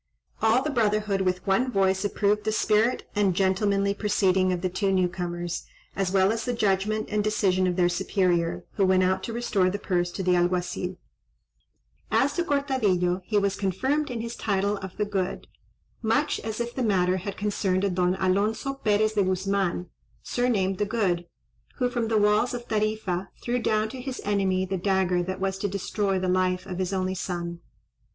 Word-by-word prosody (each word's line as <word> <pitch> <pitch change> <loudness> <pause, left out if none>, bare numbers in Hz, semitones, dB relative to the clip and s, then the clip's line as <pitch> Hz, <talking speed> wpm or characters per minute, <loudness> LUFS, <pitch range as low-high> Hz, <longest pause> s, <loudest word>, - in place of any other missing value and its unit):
All 225 +4 +4
the 305 - -1
brotherhood 210 -5 +1
with 185 -1 -1
one 245 +7 +2
voice 190 -2 +2
approved 205 +1 +1
the 215 - 0
spirit 220 +2 +1
and 200 -3 +2
gentlemanly 200 +1 +2
proceeding 190 -3 +2
of 180 -1 -2
the 185 - +1
two 195 +2 0
new 185 -1 +3
comers, 175 -1 -4 0.3
as 195 -2 0
well 190 +1 +4
as 225 0 -2
the 245 - -1
judgment 210 0 0
and 210 0 +1
decision 190 -3 +2
of 180 - 0
their 180 -1 +3
superior, 175 -1 0
who 195 - +4
went 185 0 +4
out 190 +1 +1
to - - -5
restore 220 -5 +1
the 195 - -2
purse 175 -3 -1
to 190 - -3
the 180 0 +3
Alguazil. 180 +1 -1 1.1
As 285 +2 +2
to 345 - 0
Cortadillo, 215 - +1
he 210 - 0
was 200 -1 +1
confirmed 265 +11 0
in 240 -2 -3
his 235 +1 -5
title 200 0 0
of 190 -2 -8
the 210 - +1
Good, 195 -2 -2 0.6
much 240 +6 +1
as 220 0 -5
if 235 0 -3
the 260 - -3
matter 185 -5 +2
had 195 +2 -5
concerned 200 -2 0
a 200 - +2
Don 180 0 +1
Alonzo 200 +8 0
Perez 215 -4 +1
de 210 - +2
Guzman, 190 -1 0 0.4
surnamed 200 -7 0
the 205 - +2
Good, 190 -6 0 0.5
who 250 -2 0
from 240 -2 -1
the 220 -1 +1
walls 210 +4 +3
of 240 0 -7
Tarifa 210 -4 -1
threw 245 +1 0
down 215 -2 +1
to 255 +1 -7
his 260 0 -5
enemy 190 -2 +1
the 190 0 -2
dagger 185 -1 +1
that 185 +2 -4
was 195 0 -2
to 205 - 0
destroy 200 0 -1
the 185 0 -1
life 185 0 +1
of 185 -2 -5
his 185 0 -1
only 185 -1 -1
son. 175 -2 -4
195 Hz, 190 wpm, -26 LUFS, 185-215 Hz, 1.1 s, All